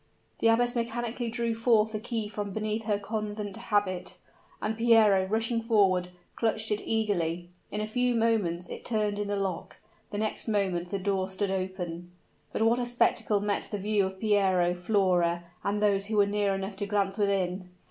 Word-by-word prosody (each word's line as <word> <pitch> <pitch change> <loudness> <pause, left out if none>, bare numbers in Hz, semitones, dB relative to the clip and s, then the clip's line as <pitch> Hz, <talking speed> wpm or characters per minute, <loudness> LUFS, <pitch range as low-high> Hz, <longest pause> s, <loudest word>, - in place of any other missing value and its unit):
The - - +3
abbess 240 +2 +3
mechanically 235 0 -2
drew 235 0 -1
forth 225 -1 +3
the 215 - -3
key 225 -1 -3
from 210 -1 -4
beneath 215 +1 -2
her 210 -2 +1
convent 205 -1 -4
habit, 195 -5 -1 0.4
and 215 +1 -1
Piero, 220 -4 +5
rushing 225 +3 0
forward, 195 -6 +3 0.3
clutched 220 -1 -1
it 210 - 0
eagerly. 175 -6 -1 0.2
In 210 - -2
a - - -1
few 245 +2 +1
moments 210 -7 +1
it - - -8
turned 210 -3 0
in 205 - -2
the 205 - -1
lock 195 -4 -3 0.3
the 205 - -5
next 215 +2 -2
moment 190 -5 0
the 200 - -1
door 190 -1 -1
stood 190 +1 -1
open. 180 -2 -4 0.4
But - - 0
what 230 +2 +3
a 245 - 0
spectacle 225 -3 +2
met 205 0 -1
the 205 - -3
view 205 0 +1
of 190 0 -9
Piero, 190 -5 +3
Flora, 180 -2 +1 0.2
and 205 +1 0
those 200 -1 +2
who 215 0 -1
were 205 - +6
near 200 -1 0
enough 195 0 -5
to 205 0 -3
glance 200 0 0
within! 190 -2 0
205 Hz, 180 wpm, -28 LUFS, 190-220 Hz, 0.4 s, were